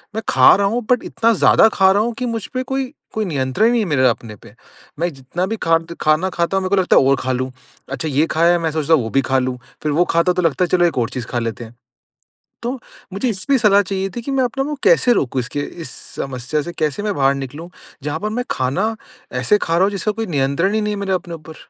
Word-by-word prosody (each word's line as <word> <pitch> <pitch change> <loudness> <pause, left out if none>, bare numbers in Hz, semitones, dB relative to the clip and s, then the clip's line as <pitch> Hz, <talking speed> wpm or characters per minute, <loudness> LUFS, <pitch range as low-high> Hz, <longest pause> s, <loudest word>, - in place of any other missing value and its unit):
मैं 220 - -1
खा 130 -1 +7
रहा 200 +1 +1
हूँ 235 +2 -2
बट 250 - +3
इतना 230 0 +1
ज़्यादा 185 +5 +5
खा 190 -1 +4
रहा 200 +2 +3
हूँ 235 - -2
कि 250 - -1
मुझपे 235 +2 -3
कोई 265 +1 -3 0.2
कोई 220 -1 -1
नियंत्रण 145 - +1
नहीं 240 - +2
है - - -1
मेरे 130 -4 +3
अपने 115 -2 -2
पे। 105 +1 -17 0.5
मैं 175 +1 +1
जितना 135 +7 -4
भी 225 +2 -3
खा 165 0 +4
द 170 +1 -10
खाना 155 +5 +2
खाता 175 +2 -1
हूँ 190 - 0
मेरे 185 - -2
को 200 - +3
लगता 180 - +3
है - - +6
और 140 - +5
खा 130 - -2
लूँ। 130 +1 -2 0.4
अच्छा 140 +4 -3
ये 145 +3 +2
खाया 170 +2 +4
है - - +3
मैं 160 -1 -1
सोचता 155 0 +1
वो 115 -6 -1
भी 135 - +3
खा 135 - +3
लूँ। 125 -1 -2 0.3
फिर 150 - 0
वो 175 +4 +3
खाता 170 +2 +3
तो 180 - 0
लगता 165 +3 +2
है - - -5
चलो 175 0 +3
एक 170 - 0
और 115 +1 0
चीज़ 125 -2 -5
खा 120 - -2
लेते 115 0 -4
हैं। 115 - -15 0.9
तो 245 +2 -1 0.4
मुझे 235 +6 -1
इस 190 -4 -4
पे 275 - +5
सलाह 205 -1 +5
चाहिए 195 0 -3
थी 240 - -4
कि 275 - -5
मैं 265 -1 +2
अपने 270 +3 -2
को 295 +2 -3
कैसे 465 - +5
रोकूँ? 135 - 0
इसके 125 +4 -4
इस 160 0 -7 0.3
समस्या 135 +3 -3
से 175 +4 -6
कैसे 155 +5 -1
मैं 210 -1 -1
बाहर 135 0 +2
निकलूँ? 145 +5 -7 0.3
जहाँ 150 +2 -3
पर 215 - -2
मैं 245 +3 -3
खाना 185 - 0 0.5
ऐसे 210 +11 +3
खा 165 - 0
रहा 175 - +4
हूँ 200 - +2
जिसका 200 +1 -1
कोई 225 +1 -4
नियंत्रण 145 +5 0
ही 220 - +1
नहीं 210 0 -1
है 200 - -4
मेरे 195 -1 -3
अपने 180 -2 -3
ऊपर। 160 0 -12
170 Hz, 265 wpm, -19 LUFS, 140-210 Hz, 0.9 s, खा